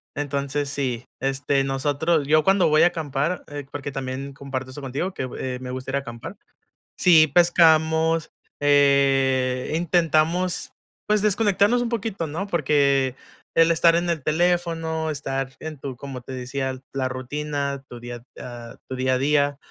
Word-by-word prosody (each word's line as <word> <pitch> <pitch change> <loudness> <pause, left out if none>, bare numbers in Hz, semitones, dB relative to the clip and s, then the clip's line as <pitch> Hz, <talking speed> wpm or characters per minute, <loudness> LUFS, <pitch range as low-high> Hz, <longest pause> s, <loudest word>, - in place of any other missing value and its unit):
Entonces 140 0 -2
sí, 130 -4 -2
este, 135 +1 0
nosotros 145 +3 0
yo 155 0 +4
cuando 195 -3 +4
voy 155 +2 +5
a - - +7
acampar, 155 0 -2
eh, 145 -2 -7
porque 140 -1 -5
también 135 +1 -5
comparto 135 -1 -6
eso 145 - -8
contigo 140 +8 -3
que, 130 - -4
eh, 125 -1 -4
me 125 0 -6
gusta 130 +1 -5
ir - - -1
a - - +1
acampar, 120 -4 -9 0.6
sí 160 -3 +6
pescamos, 160 -2 +4 0.3
eh, 135 -3 +3
intentamos 170 +1 +1 0.4
pues 210 -1 +2
desconectarnos 210 +2 +3
un 240 - -1
poquito, 220 -7 -3
¿no?, 165 +7 -4
porque 140 -6 +2 0.4
el 165 0 +5
estar 165 0 +4
en 175 0 0
el 165 -4 -2
teléfono, 165 0 0
estar 135 -2 -3
en 155 -2 -7
tu 130 -2 -6
como 135 -1 -7
te 125 - -10
decía 130 +1 -3
la 130 -1 -1
rutina, 140 +2 -3
tu 120 - -10
día, 120 0 -8 0.2
ah, 120 -1 -9
tu 130 - -3
día 130 0 +1
a - - +1
día, 145 0 +2
145 Hz, 160 wpm, -23 LUFS, 135-165 Hz, 0.6 s, a